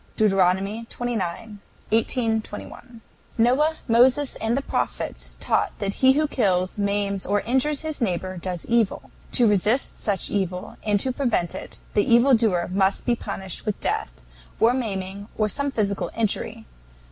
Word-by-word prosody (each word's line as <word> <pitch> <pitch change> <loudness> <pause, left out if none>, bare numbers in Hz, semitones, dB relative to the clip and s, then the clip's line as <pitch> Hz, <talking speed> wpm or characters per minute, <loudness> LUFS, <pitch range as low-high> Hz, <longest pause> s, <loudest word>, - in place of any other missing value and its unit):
DEUT. 215 -2 +4 0.3
xix. 215 -1 -4 0.3
18, 225 0 +2
21. 230 +2 -9 0.4
Noah, 265 +7 +3
Moses, 255 +4 +4
and 225 +3 0
the 275 - -2
Prophets - - -3
taught - - 0
that 200 -1 -2
he 260 0 +7
who 305 +2 +1
kills, 185 -9 0
maims, 200 -1 -1
or 205 +1 +1
injures 265 +5 +1
his 310 -3 -3
neighbors 185 -3 -2
does 180 -2 -4
evil. 235 -3 0 0.2
To 240 -3 +4
resist 210 +5 +2
such 200 -4 -1
evil, 185 -3 -3
and 210 -2 +1
to 260 - +1
prevent 240 - 0
it, - - -8 0.2
the 205 - +4
evil 240 +4 +6
doer 210 -7 +2
must 195 0 +1
be 240 - +2
punished 195 -4 -6
with 210 -2 -3
death, - - -2 0.5
or 230 +2 +5
maiming, 200 -5 -4
or 215 - +2
some 280 +7 -1
physical 205 -6 -1
injury. 225 0 -2
220 Hz, 150 wpm, -24 LUFS, 195-245 Hz, 0.5 s, he